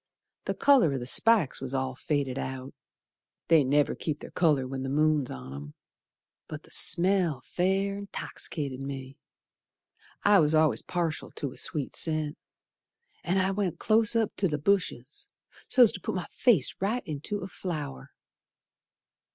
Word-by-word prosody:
The - - -2
colour 260 - +4
o' - - -1
the 120 - -5
spikes 195 - +3
was 135 0 -3
all 130 0 -1
faded 135 -1 -2
out, 130 0 -6 0.8
They 160 -3 +6
never 145 +2 +2
keep 150 -2 -4
their - - -10
colour 150 -7 +2
when 135 0 -5
the 135 - -4
moon's 150 -1 +1
on 65 +1 -8
'em, 70 +1 -9 0.7
But 155 0 -8
the - - -19
smell 175 -6 +3
fair 195 +5 -1
'toxicated 140 -5 -4
me. 135 0 -7 1.0
I 205 -1 +6
was 155 -1 +3
al'ays 155 -1 +3
partial 170 -3 -3
to 140 - -4
a - - -14
sweet 145 -4 -1
scent, 155 -2 +1 0.9
An' 180 +2 0
I 190 0 +1
went 195 -3 -2
close 225 +1 +2
up 225 -2 0
t' 195 - +1
th' 150 -3 -4
bushes 175 -8 -1 0.4
So's 245 -4 +6
to 185 - -7
put - - -3
my 185 - -3
face 220 - +3
right 220 +6 -1
into 155 +7 -4
a 185 - -5
flower. 150 -8 -6
155 Hz, 155 wpm, -28 LUFS, 135-190 Hz, 1.0 s, They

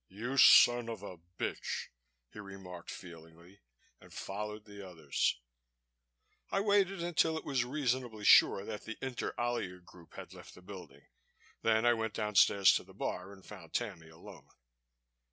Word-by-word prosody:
"You 120 +7 -5
son 120 -2 +7
of 110 -4 -7
a 90 -4 -9 0.2
bitch!" - - -4 0.4
he - - -10
remarked 95 -3 -10
feelingly, 85 +2 -12 0.4
and - - -18
followed 105 +2 -6
the 100 -1 -11
others. 80 -8 -2 1.1
I - - 0
waited 195 -3 +1
until 165 -2 +1
it - - -7
was 135 -4 0
reasonably 125 -5 -2
sure 100 - +6
that 105 -2 -7
the 115 - -7
Inter 130 -2 -4
Alia 120 -7 -2
group 90 -1 -18
had - - -10
left - - -13
the 90 - -16
building. 90 -8 -12 0.6
Then 110 0 +2
I 120 - +5
went 110 -2 -3
downstairs 105 -2 +4
to - - -8
the - - -18
bar 90 +2 -4
and 95 -1 -15
found 90 -6 -12
Tammy 95 -9 -4
alone. 80 - -14
105 Hz, 155 wpm, -32 LUFS, 90-120 Hz, 1.1 s, son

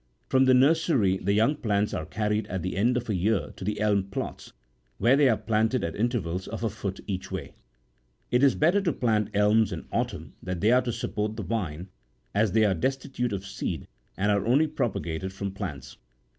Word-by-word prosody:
From 130 0 +4
the 130 -1 +6
nursery 135 - +3
the 100 - 0
young 115 +8 +3
plants 105 -4 0
are 80 - -3
carried 105 +1 -1
at 95 -1 -4
the 90 - -3
end 120 +6 +2
of 120 - -3
a 110 - 0
year 100 +3 0
to - - -8
the 105 +2 -2
elm 105 -2 +2
plots, 100 - -6 0.5
where 125 +3 +4
they 140 -2 +5
are 110 - +3
planted 110 +3 +1
at 85 -1 -3
inter 120 +3 +1
vals 90 +1 -4
of - - -5
a 110 - 0
foot 100 -2 -5
each 95 -2 -4
way. - - -5 0.8
It 125 - +3
is 140 -2 +5
better 175 +7 +3
to 170 -6 0
plant 110 -5 +1
elms 105 +2 +4
in - - -5
autumn - - -3
that 90 +2 -3
are 125 +3 +5
to 125 -1 -2
support 110 -2 -3
the 110 - -4
vine, 90 -3 -3 0.4
as 105 -1 +2
they 110 -1 +4
are 100 - +3
destitute 130 - -2
59 105 - -2
of - - -14
seed - - -4 0.3
and 100 +2 +2
are 100 -1 +2
only 130 +8 +4
propagated 95 - -2
from 100 0 -4
plants. 75 -10 -7
105 Hz, 210 wpm, -27 LUFS, 95-120 Hz, 0.8 s, the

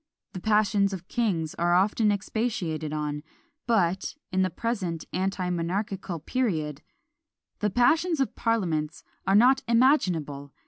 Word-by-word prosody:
The 185 - -5
passions 210 -2 +2
of 185 -1 -7
kings 180 -10 -1
are 175 +1 +3
often 210 +3 +3
expatiated 195 -7 -2
on; 150 -1 -3 0.5
but, 190 - +1 0.2
in 190 0 +1
the 185 - +2
present 185 -6 -3
anti 185 0 -1
monarchical 185 +2 -2
period, 155 - -2 0.8
the 210 - +1
passions 315 - +2
of 270 - 0
parliaments 165 -10 -1 0.2
are 195 - +4
not 255 +5 +5
imaginable! 175 - +2
190 Hz, 125 wpm, -27 LUFS, 165-230 Hz, 0.8 s, not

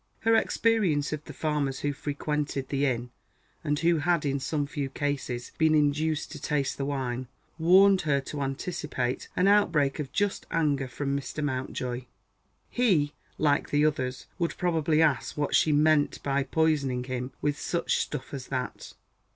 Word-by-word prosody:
Her 225 0 +3
experience 205 -11 +2
of 155 0 -5
the - - -8
farmers 150 -4 -1
who 145 0 0
frequented 145 -1 -3
the 140 0 +1
inn, 120 -1 -2 0.5
and 145 0 0
who 170 +2 +3
had 165 0 +1
in 140 0 0
some 145 +2 -1
few 140 -1 -4
cases 135 -4 -3
been 160 -1 +4
induced 150 +1 +1
to - - -8
taste 140 -3 -1
the 135 - -1
wine, 130 -3 -3 0.3
warned 190 +3 +6
her 145 -3 +1
to 145 +1 -6
anticipate 135 -2 -3
an 180 - +3
outbreak 165 -9 +3
of 140 -3 -4
just 205 -2 -1
anger 145 -5 +1
from 140 +2 -2
Mr. 140 +2 -4
Mountjoy. 130 -2 -3 0.6
He, 170 -12 +2 0.2
like 145 -2 +2
the 145 +1 +3
others, 130 -4 -1
would 170 -1 -1
probably 160 -3 +2
ask 145 -3 0
what 145 -1 -1
she 155 - +4
"meant 150 0 +3
by 140 -1 0
poisoning 140 -4 +1
him 130 0 -4
with 145 0 -1
such 170 - 0
stuff 150 +1 -4
as 135 -2 -6
that." 130 -2 -4
145 Hz, 160 wpm, -28 LUFS, 135-160 Hz, 0.6 s, warned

